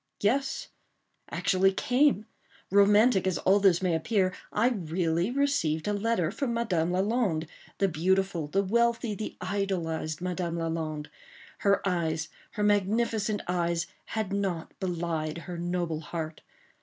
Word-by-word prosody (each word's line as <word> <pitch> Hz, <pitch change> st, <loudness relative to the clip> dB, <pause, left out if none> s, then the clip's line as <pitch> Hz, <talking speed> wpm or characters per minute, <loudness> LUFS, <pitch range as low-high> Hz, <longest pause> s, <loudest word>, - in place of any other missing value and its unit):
Yes, 270 Hz, +6 st, 0 dB, 0.6 s
actually 190 Hz, +1 st, +2 dB
came. 250 Hz, +2 st, +2 dB, 0.5 s
Romantic 200 Hz, +1 st, +5 dB
as 185 Hz, -, +1 dB
all 195 Hz, +2 st, +4 dB
this 190 Hz, -3 st, +4 dB
may 180 Hz, -2 st, +2 dB
appear, 185 Hz, +3 st, +1 dB, 0.2 s
I 230 Hz, +4 st, +3 dB
really 170 Hz, -3 st, 0 dB
received 245 Hz, -, +1 dB
a 205 Hz, -, +1 dB
letter 205 Hz, -5 st, 0 dB
from 235 Hz, +2 st, -2 dB
Madame 180 Hz, -8 st, +1 dB
Lalande—the 195 Hz, -2 st, -1 dB
beautiful, 185 Hz, -1 st, +1 dB
the 195 Hz, +7 st, +1 dB
wealthy, 235 Hz, +2 st, +1 dB
the 215 Hz, +1 st, -6 dB
idolized 180 Hz, -5 st, -2 dB
Madame 180 Hz, -1 st, -2 dB
Lalande. 160 Hz, -2 st, -3 dB, 0.5 s
Her 200 Hz, -2 st, +2 dB
eyes—her 165 Hz, +2 st, -2 dB
magnificent 210 Hz, +1 st, +1 dB
eyes, 170 Hz, -1 st, 0 dB, 0.2 s
had 215 Hz, -3 st, -3 dB
not 190 Hz, -5 st, -2 dB
belied 170 Hz, -4 st, -2 dB
her 170 Hz, 0 st, -6 dB
noble 175 Hz, -2 st, -1 dB
heart. 160 Hz, 0 st, -5 dB
185 Hz, 120 wpm, -28 LUFS, 165-210 Hz, 0.6 s, Romantic